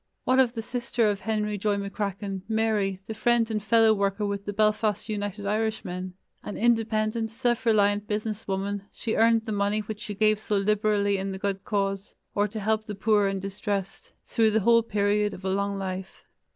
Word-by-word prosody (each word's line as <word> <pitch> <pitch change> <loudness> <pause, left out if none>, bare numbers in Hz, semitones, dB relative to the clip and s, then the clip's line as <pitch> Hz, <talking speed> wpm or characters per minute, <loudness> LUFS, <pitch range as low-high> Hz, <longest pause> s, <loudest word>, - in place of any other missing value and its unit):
What 255 +1 +3
of 250 -3 +4
the 225 - -3
sister 240 -1 0
of 200 0 -5
Henry 210 -2 -1
Joy 205 0 +1
McCracken, 200 -1 -3
Mary, 215 -4 +1
the 220 - -5
friend 235 +1 +2
and 215 -1 -1
fellow 225 +1 +5
worker 200 0 0
with 200 0 -3
the 205 - -2
Belfast 215 0 +1
United 205 -1 -4
Irishmen? 200 -4 -2 0.3
An 205 - -6
independent, 225 -1 +1
self 240 +1 -1
reliant 205 -1 +3
business 215 0 -3
woman, 200 +1 -2
she 225 - -3
earned 225 0 +4
the 220 - -4
money 205 +1 +1
which 210 0 -6
she 210 -1 -6
gave 215 0 +3
so 210 -1 -1
liberally 205 0 +2
in 195 +1 -3
the 190 - -4
good 195 0 -2
cause, 195 -1 -2 0.2
or 205 +1 +2
to 215 +2 -6
help 215 +1 0
the 210 - -4
poor 205 0 +3
and 195 -1 -2
distressed, 195 0 -4 0.2
through 225 -1 +3
the 220 0 +2
whole 230 +3 +5
period 210 -1 +1
of 185 - -11
a - - +1
long 200 0 -1
life. 190 0 -5
210 Hz, 190 wpm, -26 LUFS, 200-220 Hz, 0.3 s, fellow